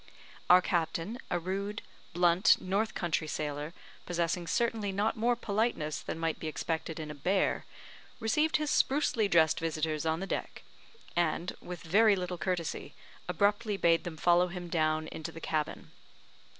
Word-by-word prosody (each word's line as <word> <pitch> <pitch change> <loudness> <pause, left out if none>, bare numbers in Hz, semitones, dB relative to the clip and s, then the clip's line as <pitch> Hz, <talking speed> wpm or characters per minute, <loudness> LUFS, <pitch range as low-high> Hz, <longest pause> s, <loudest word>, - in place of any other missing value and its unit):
Our 180 0 +8
captain, 170 +6 -1
a - - +1
rude, 195 +4 -3 0.3
blunt 175 +1 +5
north 205 +4 -1
country 165 -2 -1
sailor, 150 0 -3 0.4
possessing 170 0 -1
certainly 225 0 0
not 205 +3 0
more 240 +2 +2
politeness 210 -9 -1
than - - -5
might 165 -1 -1
be 160 - -4
expected 160 +1 -3
in 155 -1 -5
a - - -6
bear, 180 +7 0 0.5
received 300 +9 +2
his 305 -1 -1
sprucely 265 -6 +2
dressed 160 -4 +4
visitors 155 -1 -1
on 160 0 0
the 195 - -3
deck, - - -4 0.5
and, 170 +1 0
with 180 -2 -7
very 205 +5 +5
little 180 -1 -4
courtesy, 180 -4 -3 0.3
abruptly 205 +3 +1
bade 165 -3 +3
them 165 -2 -6
follow 175 +2 +4
him 175 -1 -7
down 155 -2 +1
into 160 +1 -6
the 165 - -9
cabin. 155 -2 -3
175 Hz, 150 wpm, -31 LUFS, 160-205 Hz, 0.5 s, Our